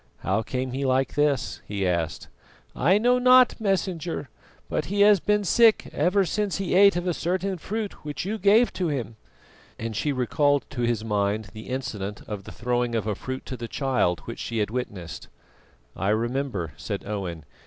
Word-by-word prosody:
"How 100 Hz, +4 st, +1 dB
came 130 Hz, +3 st, -3 dB
he 135 Hz, +2 st, -3 dB
like 130 Hz, 0 st, +1 dB
this?" 145 Hz, -2 st, 0 dB
he 100 Hz, -2 st, -1 dB
asked. 85 Hz, -3 st, -2 dB, 0.5 s
"I 175 Hz, +9 st, +4 dB
know 245 Hz, +3 st, +3 dB
not, 250 Hz, -1 st, +6 dB
Messenger, 180 Hz, -, -1 dB, 0.4 s
but -, -, -2 dB
he 200 Hz, +2 st, 0 dB
has 205 Hz, -1 st, +7 dB
been 210 Hz, +3 st, +1 dB
sick 225 Hz, +3 st, +4 dB
ever 185 Hz, +6 st, +2 dB
since 205 Hz, +1 st, -1 dB
he 195 Hz, -1 st, -2 dB
ate 200 Hz, +1 st, +6 dB
of 175 Hz, 0 st, -2 dB
a 180 Hz, -, +1 dB
certain 185 Hz, +3 st, -2 dB
fruit 210 Hz, +3 st, -5 dB
which 150 Hz, +1 st, -4 dB
you 215 Hz, +3 st, -2 dB
gave 210 Hz, +5 st, +4 dB
to 180 Hz, -, -1 dB
him;" 130 Hz, -7 st, -3 dB, 0.6 s
and 115 Hz, -1 st, -4 dB
she 145 Hz, +7 st, 0 dB
recalled 145 Hz, +2 st, +1 dB
to 130 Hz, -4 st, -4 dB
his 120 Hz, -2 st, 0 dB
mind 105 Hz, -1 st, 0 dB
the 110 Hz, +2 st, -9 dB
incident 105 Hz, -6 st, -4 dB
of 100 Hz, -2 st, -6 dB
the -, -, -8 dB
throwing 120 Hz, 0 st, -1 dB
of 110 Hz, -, -1 dB
a 110 Hz, -, 0 dB
fruit 130 Hz, +6 st, -6 dB
to 130 Hz, -, -5 dB
the 120 Hz, -1 st, -6 dB
child, 125 Hz, -, 0 dB
which 115 Hz, -, -8 dB
she 115 Hz, -, -4 dB
had 105 Hz, -1 st, 0 dB
witnessed. 95 Hz, -10 st, -5 dB, 0.7 s
"I 95 Hz, +3 st, -1 dB
remember," 115 Hz, -, -1 dB
said 100 Hz, -2 st, -4 dB
Owen. 90 Hz, -7 st, -4 dB
130 Hz, 185 wpm, -25 LUFS, -, 0.7 s, has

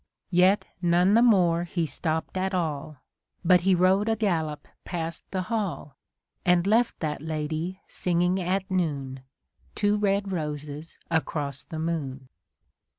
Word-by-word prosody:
Yet 185 Hz, +3 st, +4 dB, 0.2 s
none 175 Hz, +2 st, +4 dB
the 230 Hz, -, +6 dB
more 180 Hz, -8 st, +4 dB
he 170 Hz, -1 st, -1 dB
stopp'd 160 Hz, +4 st, -2 dB
at 190 Hz, +1 st, -1 dB
all, 155 Hz, -4 st, -2 dB, 0.5 s
But 180 Hz, 0 st, +6 dB
he 190 Hz, +1 st, +3 dB
rode 190 Hz, +4 st, +3 dB
a 225 Hz, -, +2 dB
gallop 165 Hz, -8 st, -1 dB, 0.2 s
past 165 Hz, -2 st, -4 dB
the 185 Hz, -1 st, -2 dB
hall; 195 Hz, -, -3 dB, 0.5 s
And 175 Hz, 0 st, +3 dB
left 230 Hz, +4 st, +2 dB
that 150 Hz, -3 st, -2 dB
lady 160 Hz, +3 st, -3 dB
singing 180 Hz, +1 st, +1 dB
at 190 Hz, +2 st, -1 dB
noon. 140 Hz, -7 st, -1 dB, 0.6 s
Two 205 Hz, 0 st, +2 dB
red 200 Hz, -1 st, +1 dB
roses 150 Hz, -2 st, -5 dB
across 145 Hz, -4 st, -1 dB
the 160 Hz, -, -8 dB
moon. 140 Hz, -5 st, -3 dB
175 Hz, 135 wpm, -26 LUFS, 155-190 Hz, 0.6 s, the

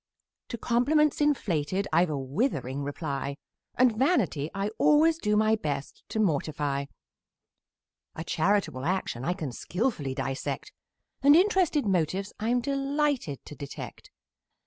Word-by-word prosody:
To 235 Hz, -, -5 dB
compliments 290 Hz, +7 st, +2 dB
inflated 195 Hz, -, 0 dB
I've 170 Hz, +2 st, +4 dB
a 150 Hz, -, -2 dB
withering 135 Hz, -, -1 dB
reply; 140 Hz, -1 st, -4 dB, 0.4 s
And 250 Hz, -3 st, +4 dB
vanity 215 Hz, -, +1 dB
I 195 Hz, +1 st, -2 dB
always 310 Hz, +2 st, +4 dB
do 210 Hz, -4 st, +1 dB
my 215 Hz, +1 st, +4 dB
best 145 Hz, -9 st, -4 dB
to 220 Hz, -, -2 dB
mortify; 145 Hz, -6 st, 0 dB, 1.3 s
A 160 Hz, -, -5 dB
charitable 170 Hz, -5 st, 0 dB
action 175 Hz, -9 st, -1 dB
I 175 Hz, -, +1 dB
can 155 Hz, -8 st, -5 dB
skilfully 170 Hz, -, -2 dB
dissect: 135 Hz, +1 st, -3 dB, 0.5 s
And 285 Hz, +2 st, +7 dB
interested 360 Hz, -, +3 dB
motives 190 Hz, +1 st, 0 dB
I'm 240 Hz, +3 st, +1 dB
delighted 275 Hz, -, -1 dB
to -, -, -9 dB
detect. 140 Hz, -1 st, -8 dB
195 Hz, 125 wpm, -28 LUFS, -, 1.3 s, And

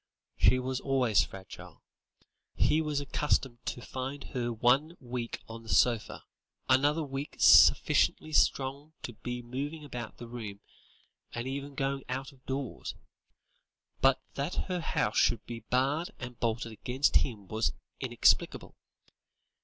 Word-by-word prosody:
She 130 Hz, -, +4 dB
was 130 Hz, 0 st, -2 dB
always 130 Hz, -6 st, +2 dB
fragile; 95 Hz, 0 st, -11 dB, 0.7 s
he 155 Hz, -, +3 dB
was 150 Hz, -2 st, -1 dB
accustomed 135 Hz, -3 st, -1 dB
to 120 Hz, -, -4 dB
find 135 Hz, +3 st, -5 dB
her 120 Hz, -2 st, -1 dB
one 130 Hz, +9 st, +2 dB
week 120 Hz, -2 st, -5 dB
on 115 Hz, 0 st, -8 dB
the 115 Hz, -, -13 dB
sofa, 115 Hz, -1 st, +2 dB, 0.4 s
another 145 Hz, +5 st, +3 dB
week 140 Hz, 0 st, -5 dB
sufficiently 155 Hz, -, +6 dB
strong 140 Hz, +2 st, +1 dB
to 120 Hz, -, -5 dB
be 120 Hz, +2 st, -6 dB
moving 145 Hz, +6 st, -5 dB
about 120 Hz, -5 st, -7 dB
the 120 Hz, -, -9 dB
room, 110 Hz, -4 st, -7 dB, 0.7 s
and 120 Hz, +2 st, -4 dB
even 140 Hz, +1 st, -5 dB
going 135 Hz, 0 st, -1 dB
out 130 Hz, +1 st, -3 dB
of 130 Hz, -2 st, -23 dB
doors. 135 Hz, -2 st, -4 dB, 1.1 s
But 135 Hz, -1 st, +5 dB
that 140 Hz, +5 st, -3 dB
her 180 Hz, -1 st, -1 dB
house -, -, 0 dB
should 120 Hz, -, +2 dB
be 120 Hz, -1 st, -6 dB
barred 135 Hz, +9 st, 0 dB
and 125 Hz, -1 st, -8 dB
bolted 115 Hz, 0 st, -1 dB
against 125 Hz, +6 st, +2 dB
him 105 Hz, -7 st, -3 dB
was 110 Hz, +3 st, 0 dB, 0.3 s
inexplicable. -, -, +2 dB
130 Hz, 135 wpm, -30 LUFS, 120-140 Hz, 1.1 s, sufficiently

